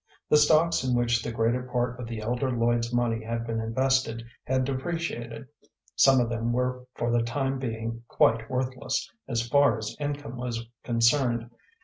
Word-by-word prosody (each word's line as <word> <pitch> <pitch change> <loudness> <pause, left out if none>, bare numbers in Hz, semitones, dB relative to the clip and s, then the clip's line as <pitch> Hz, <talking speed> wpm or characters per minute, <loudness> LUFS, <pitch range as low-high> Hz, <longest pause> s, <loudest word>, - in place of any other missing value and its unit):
The 150 - +6
stocks 155 +1 +4
in 125 -1 +1
which 120 -1 +2
the - - -4
greater 115 +2 +1
part 125 0 -2
of 120 - -5
the 115 -1 -5
elder 120 +4 -1
Lloyd's 120 0 +1
money 120 -2 0
had 115 +1 -3
been 115 -1 -2
invested 115 0 0 0.2
had 130 0 +1
depreciated; 135 -3 -3 0.5
some 135 -1 +6
of 120 - +2
them 115 0 -1
were 125 +1 -1
for 120 - -1
the 120 0 +3
time 135 +3 -1
being 115 -2 -4
quite 115 0 +2
worthless 130 +1 -2 0.2
as 115 -1 -1
far 140 -3 +4
as 110 -1 -5
income 145 -3 -4
was 120 -2 -4 0.2
concerned. 120 0 +2
120 Hz, 165 wpm, -27 LUFS, 115-130 Hz, 0.5 s, The